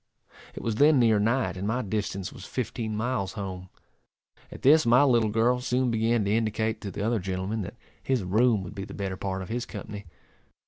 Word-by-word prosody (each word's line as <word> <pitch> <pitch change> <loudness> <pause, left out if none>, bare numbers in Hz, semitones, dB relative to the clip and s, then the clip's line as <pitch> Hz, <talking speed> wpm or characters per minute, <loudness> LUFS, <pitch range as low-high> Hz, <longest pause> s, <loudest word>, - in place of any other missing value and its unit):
It - - -7
was 110 -2 -1
then 145 +2 +6
near 115 -4 +4
night, 115 +4 +1
and 95 +2 -3
my 125 +4 0
distance 100 -2 -3
was - - -11
fifteen 115 -3 -3
miles 110 -4 -1
home. 95 -2 -6 0.8
At - - -11
this 155 +4 +6
my 125 +3 +5
little 120 -5 +3
girl 115 +3 +2
soon 125 0 0
began 115 -1 +1
to 100 - 0
indicate 110 0 -1
to 100 - -5
the 100 +2 -5
other 115 0 +1
gentleman 95 +3 -3
that 100 +5 -7 0.2
his 130 -6 0
room 110 +2 +2
would 90 - -8
be 100 -2 -5
the - - -10
better 95 -2 -3
part 95 0 -3
of - - -10
his 120 +1 -3
company. 105 -1 -7
110 Hz, 200 wpm, -27 LUFS, 100-120 Hz, 0.8 s, then